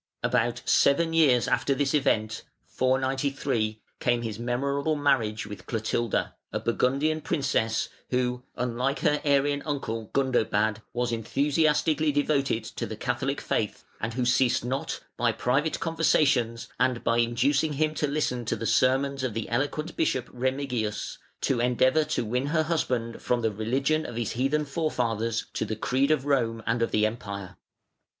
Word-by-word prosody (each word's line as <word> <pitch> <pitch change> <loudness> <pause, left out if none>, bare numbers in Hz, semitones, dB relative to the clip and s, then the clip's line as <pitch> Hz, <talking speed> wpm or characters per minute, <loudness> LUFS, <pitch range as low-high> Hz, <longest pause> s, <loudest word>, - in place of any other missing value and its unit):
About 120 -1 +1
seven 165 +4 +3
years 140 -7 +4
after 140 - +1
this 140 0 0
event 115 -6 +1 0.2
(493) 130 -4 0 0.2
came 120 -1 +1
his 110 -2 -4
memorable 140 +5 0
marriage 130 -8 +1
with 105 -1 -9
Clotilda, 115 0 -1 0.2
a - - -1
Burgundian 140 +6 +1
princess, 130 -8 0 0.2
who, 125 -1 0
unlike 125 +3 -1
her 150 -2 +2
Arian 145 0 +2
uncle, 115 -7 -3
Gundobad, 110 -5 +1
was 120 0 -1
enthusiastically 150 +6 +1
devoted 140 -5 +1
to - - -5
the - - -5
Catholic - - -2
faith, - - -2 0.2
and 110 +1 -3
who 125 -1 0
ceased 125 -1 +2
not 130 +2 -3 0.2
by - - +2
private 140 +6 0
conversations 140 -8 +2
and 125 -2 +1
by 115 0 +2
inducing 135 +6 +2
him 155 +2 +1
to 150 - 0
listen 140 -4 -1
to 115 - 0
the 115 +1 -5
sermons 135 +4 +2
of 120 -5 -2
the 115 - -3
eloquent 145 +6 -2
Bishop 130 -6 0
Remigius, 125 -4 -2 0.2
to 130 - +1
endeavour 130 +5 +3
to 120 - -1
win 125 +5 -1
her 160 +1 +2
husband 125 -8 -1
from 125 -1 0
the 110 -1 +1
religion 135 +9 0
of - - -7
his 115 -3 -2
heathen 135 +5 0
forefathers 115 -7 -1
to - - -1
the 110 0 -3
creed 130 +5 +1
of 150 -3 +2
Rome 115 -5 +1
and 115 +1 0
of 115 - +2
the 105 0 +2
Empire. 100 -4 -5
130 Hz, 155 wpm, -27 LUFS, 115-145 Hz, 0.2 s, years